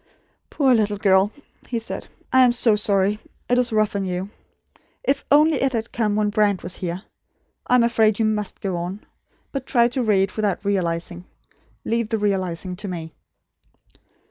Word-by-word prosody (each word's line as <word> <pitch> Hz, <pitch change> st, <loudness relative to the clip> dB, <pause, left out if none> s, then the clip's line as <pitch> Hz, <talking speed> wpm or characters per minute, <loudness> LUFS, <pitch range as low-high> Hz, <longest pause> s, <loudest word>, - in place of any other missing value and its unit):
"Poor 270 Hz, -4 st, +3 dB
little 210 Hz, -3 st, +1 dB
girl," 195 Hz, 0 st, +3 dB, 0.4 s
he 240 Hz, -, -2 dB
said, 230 Hz, -, -5 dB, 0.3 s
"I 260 Hz, 0 st, +7 dB
am 245 Hz, -1 st, +4 dB
so 235 Hz, -3 st, +3 dB
sorry. 205 Hz, 0 st, +1 dB, 0.3 s
It 245 Hz, 0 st, +2 dB
is 245 Hz, -1 st, +3 dB
rough 215 Hz, -1 st, +1 dB
on 200 Hz, -, -1 dB
you. 185 Hz, +2 st, -4 dB, 0.7 s
If 275 Hz, +1 st, 0 dB
only 300 Hz, 0 st, +4 dB
it 270 Hz, -1 st, +1 dB
had 230 Hz, -1 st, -3 dB
come 215 Hz, -3 st, 0 dB
when 210 Hz, -1 st, +1 dB
Brand 205 Hz, -2 st, +1 dB
was 175 Hz, +1 st, -4 dB
here! 180 Hz, +1 st, -4 dB, 0.6 s
I 250 Hz, -, +4 dB
am 245 Hz, -, +5 dB
afraid 220 Hz, -3 st, +3 dB
you 225 Hz, -, +1 dB
MUST 210 Hz, -2 st, -2 dB
go 190 Hz, -3 st, -2 dB
on; 180 Hz, +4 st, -5 dB, 0.5 s
but 270 Hz, -2 st, -5 dB
try 235 Hz, -2 st, +4 dB
to 255 Hz, +2 st, -1 dB
read 200 Hz, -4 st, +2 dB
without 210 Hz, -2 st, -2 dB
realising. 175 Hz, -2 st, -2 dB, 0.6 s
Leave 230 Hz, -1 st, -1 dB
the 225 Hz, -, 0 dB
realising 185 Hz, -3 st, -1 dB
to 205 Hz, -, -6 dB
me." 165 Hz, -3 st, -6 dB
210 Hz, 170 wpm, -22 LUFS, 190-235 Hz, 0.7 s, I